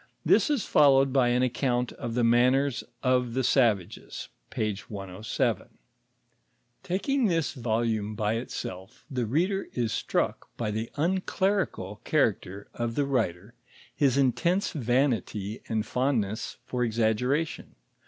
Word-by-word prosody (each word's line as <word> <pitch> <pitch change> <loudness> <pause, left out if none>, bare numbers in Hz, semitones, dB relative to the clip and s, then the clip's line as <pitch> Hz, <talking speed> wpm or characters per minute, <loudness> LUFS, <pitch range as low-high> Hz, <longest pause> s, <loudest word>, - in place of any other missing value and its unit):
This - - +4
is 285 -7 0
followed 135 -2 +5
by 130 -3 +4
an 125 +1 +2
account 125 -1 0
of 115 -1 -5
the 125 - +2
manners 125 +3 +3 0.2
of 125 -2 +1
the 130 - +1
savages 115 -9 0 0.2
(p. 105 -2 -1
107). 100 0 -3 1.1
Takiri^; 220 +8 +1
this 165 -4 0
volume 110 -4 -1
by 105 +1 0
itself, 95 -5 -7
the 125 -4 -1
render 185 - 0
is 120 -3 -1
struck - - -1
by 110 -3 -2
the 110 +2 -3
unclerical 185 - -1
character 105 - 0
of 120 -1 -3
the 145 - +1
'^ 125 -9 +1
ter, 100 +7 -18 0.4
his 140 -3 +2
intense 170 - +2
vanity 120 - 0
and 110 -1 0
fondness 115 -4 -1
for 125 -1 -1
exaggeration. 120 +7 0
125 Hz, 125 wpm, -27 LUFS, 110-140 Hz, 1.1 s, followed